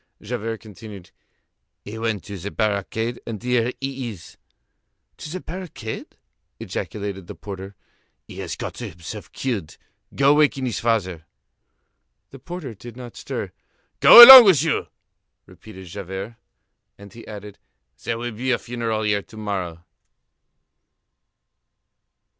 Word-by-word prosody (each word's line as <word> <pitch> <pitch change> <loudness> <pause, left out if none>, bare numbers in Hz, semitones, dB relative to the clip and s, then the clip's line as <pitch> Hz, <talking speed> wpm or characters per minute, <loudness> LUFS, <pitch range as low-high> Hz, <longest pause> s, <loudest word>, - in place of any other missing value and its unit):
Javert 115 0 -5
continued: 105 -3 -12 0.7
"He 110 +2 -8
went 110 -3 -2
to 100 - -9
the 95 +2 -6
barricade, 110 +3 -2
and 115 -2 -4
here 125 -1 0
he 135 -2 -5
is." 90 -7 -12 0.8
"To - - -9
the 185 +3 -6
barricade?" 165 - -8 0.4
ejaculated 100 -3 -6
the - - -9
porter. 100 -1 -9 0.5
"He - - -11
has - - -5
got - - -7
himself 85 -1 -9
killed. 110 - -4 0.4
Go 140 +1 +4
waken 145 -3 +2
his 120 - -3
father." 95 -8 -2 1.0
The 135 - -12
porter 165 -4 -8
did 115 +3 -12
not 125 -2 -10
stir. - - -6 0.5
"Go 240 - +12
along 260 -1 +13
with 170 -8 +4
you!" 160 - -1 0.6
repeated 95 -4 -14
Javert. 95 +4 -7 0.6
And 100 -1 -14
he 115 - -13
added: 105 -1 -10 0.4
"There 115 - -2
will 120 +1 -5
be 120 +4 -4
a 125 - +2
funeral 115 -2 -4
here 105 -1 0
to 110 - -16
morrow." 90 -5 -5
110 Hz, 130 wpm, -22 LUFS, 100-125 Hz, 1.0 s, along